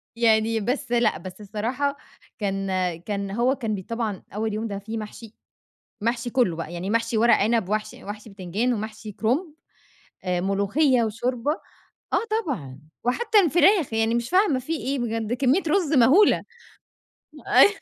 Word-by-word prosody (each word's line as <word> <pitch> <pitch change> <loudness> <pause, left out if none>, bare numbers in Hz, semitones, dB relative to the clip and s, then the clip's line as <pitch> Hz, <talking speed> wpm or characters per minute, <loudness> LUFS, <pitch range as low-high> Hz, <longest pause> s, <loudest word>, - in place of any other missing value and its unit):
يعني 225 -1 +3
بس 240 +3 -2
لأ، 235 -9 +2
بس 185 +4 -10
الصراحة 245 +8 -2 0.4
كان 195 -1 -2 0.3
كان 200 0 -3
هو 245 +5 +2
كان 225 -5 -2
بي 190 - -6
طبعًا 225 -4 -3
أول 220 0 -1
يوم 220 +2 -2
ده 200 -1 -4
فيه 220 +3 -6
محشي، 215 +1 -8 0.7
محشي 235 +2 -1
كُلّه 230 -11 +2
بقي، 165 0 -6
يعني 180 +3 -4
محشي 230 0 +1
وَرَق 235 +1 +6
عِنَب 220 -2 +1
ومحشي 215 0 -3
ومحشي 210 +1 -8
بتنجان 195 +6 -1
ومحشي 215 0 -6
كُرُنب، 290 - -1 0.7
آآ 180 -1 0
ملوخية 205 - +2
وشوربة، 245 +5 -1 0.6
آه - - +4 0.2
طبعًا، 140 - -5 0.2
وحتّى 420 - +3
الفراخ، 350 - +4
يعني 225 +1 +1
مش 235 0 -1
فاهمة 365 -8 +3
في 315 +6 -4
إيه 270 0 -2
بجد؟ 225 -1 -2
كمّية 270 +8 +2
رُز 320 -2 +1
مهولة 275 - +5 1.0
أي - - +7
225 Hz, 150 wpm, -24 LUFS, 205-255 Hz, 1.0 s, أي